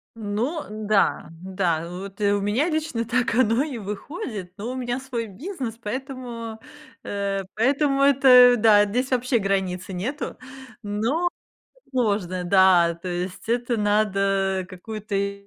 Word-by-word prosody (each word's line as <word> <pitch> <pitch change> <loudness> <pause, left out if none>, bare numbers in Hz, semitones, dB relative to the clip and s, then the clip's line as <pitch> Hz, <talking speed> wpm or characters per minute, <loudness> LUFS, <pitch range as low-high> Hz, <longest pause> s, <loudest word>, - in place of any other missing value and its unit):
Ну 230 +9 -2
да, 215 -4 +1
да, 185 -4 0
э, 170 - -7
вот 195 +3 -8
и 200 0 +3
у 205 -1 +1
меня 235 - +1
лично 310 -7 -2
так 245 -1 0
оно 240 +1 +3
и 280 -6 -5
выходит, 210 - -6
но 225 +5 -4
у - - -5
меня 245 0 -2
свой 245 -4 -4
бизнес, 250 - -6
поэтому, 235 -2 -6 0.4
э, 200 -1 -2
поэтому 275 +4 +2
это 255 -3 +7
да, 210 -2 +6
здесь 250 +6 -2
вообще 250 0 +2
границы 190 -2 -1
нету, 255 +12 -4 0.4
но 230 +12 0 0.6
сложно. 200 -8 -1
Да, 180 -2 +5
то 170 +2 -8
есть 180 +4 -5
это 240 0 0
надо 195 -2 +1
какую-то 200 0 -4
215 Hz, 135 wpm, -24 LUFS, 195-250 Hz, 0.6 s, это